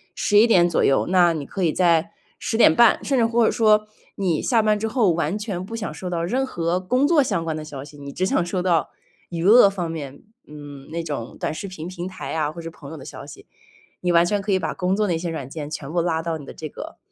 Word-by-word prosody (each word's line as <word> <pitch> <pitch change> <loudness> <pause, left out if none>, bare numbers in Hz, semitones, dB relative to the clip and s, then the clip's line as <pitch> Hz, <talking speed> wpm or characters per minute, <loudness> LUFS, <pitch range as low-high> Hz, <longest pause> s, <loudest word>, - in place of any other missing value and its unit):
11 210 +2 +4
点 175 -7 +5
左 170 - +1
右。 135 - +3
那 175 -2 +4
你 150 -3 -5
可 195 - -6
以 165 - +3
在 175 +1 +2 0.3
10 - - -3
点 225 - +6
半， 235 -2 +5
甚 275 - 0
至 230 - +4
或 230 0 +2
者 - - +3
说， 215 -1 +3 0.3
你 180 -5 0
下 235 -4 +2
班 210 -1 +2
之 220 - -1
后 220 -5 +2
完 170 +3 -1
全 205 -4 -4
不 225 +4 -7
想 220 -8 -4
收 180 +3 -6
到 170 -1 -2
任 250 +10 0
何 175 -7 -1
工 250 +9 +1
作 320 -2 +4
相 195 -10 -1
关 160 -1 -3
的 155 - -5
消 140 -3 -8
息。 145 +1 -13
你 140 0 -8
只 185 - -1
想 185 - +1
收 180 +1 -2
到， 170 -4 +1 0.4
娱 170 -2 -4
乐 210 +2 +7
方 180 -4 -4
面， 145 -4 -7 0.2
嗯， 145 -2 -11
那 165 +1 -4
种 145 -7 -6
短 - - -2
视 160 +6 -6
频 175 -4 -7
平 180 -1 -6
台 150 -7 -7
啊， 155 -2 -1
或 170 - -10
者 165 0 -7
朋 145 -3 -12
友 160 - -8
的 135 - -11
消 - - -9
息。 - - -12 0.6
你 180 - +1
完 170 0 +5
全 205 +3 0
可 200 +1 -3
以 190 - +4
把 - - -3
工 185 0 0
作 210 +1 +1
那 175 - 0
些 170 +1 -4
软 155 -6 -5
件 150 0 -6
全 150 -1 -6
部 170 +1 +1
拉 165 -1 0
到 165 -1 -2
你 145 - -10
的 - - -9
这 155 - -7
个， - - -9
175 Hz, 280 characters per minute, -22 LUFS, 160-205 Hz, 0.6 s, 乐